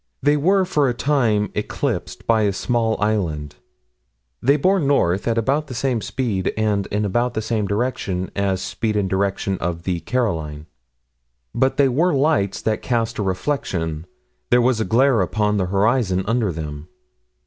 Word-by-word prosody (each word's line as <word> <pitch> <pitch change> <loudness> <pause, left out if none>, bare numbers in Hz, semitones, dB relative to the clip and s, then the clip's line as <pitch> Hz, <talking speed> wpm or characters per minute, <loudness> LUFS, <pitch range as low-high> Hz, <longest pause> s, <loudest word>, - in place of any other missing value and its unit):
They 145 +1 +4
were, 185 +6 +3
for 150 -7 +1
a 120 - -2
time, 115 -8 +1
eclipsed - - -3
by 115 -1 +3
a 100 -2 +1
small 115 +1 0
island. 85 -9 -1 0.8
They 140 +4 +4
bore 190 +6 +3
north 130 - +1
at 115 -1 +1
about 140 +7 +1
the 130 - -7
same 120 -1 0
speed 105 -8 -1
and 105 -2 0
in 105 +1 -1
about 120 +5 0
the 110 - 0
same 110 -2 -1
direction 100 -4 -2
as 100 -2 0
speed 110 -2 -2
and 100 -2 +1
direction 95 0 -1
of 85 -1 -3
the 90 -2 -1
Caroline. 80 -11 -2 0.9
But 130 0 +1
they 140 -1 +5
were 155 +6 +2
lights 135 -9 +1
that 110 -1 0
cast 115 -2 -1
a - - +1
reflection: 90 - -2 0.4
there 120 - +5
was 120 -1 +2
a 110 - 0
glare 125 -1 +3
upon 105 +2 0
the 95 -2 0
horizon 100 -1 +1
under 115 -2 +1
them. 75 -1 -6
110 Hz, 165 wpm, -21 LUFS, 95-130 Hz, 0.9 s, they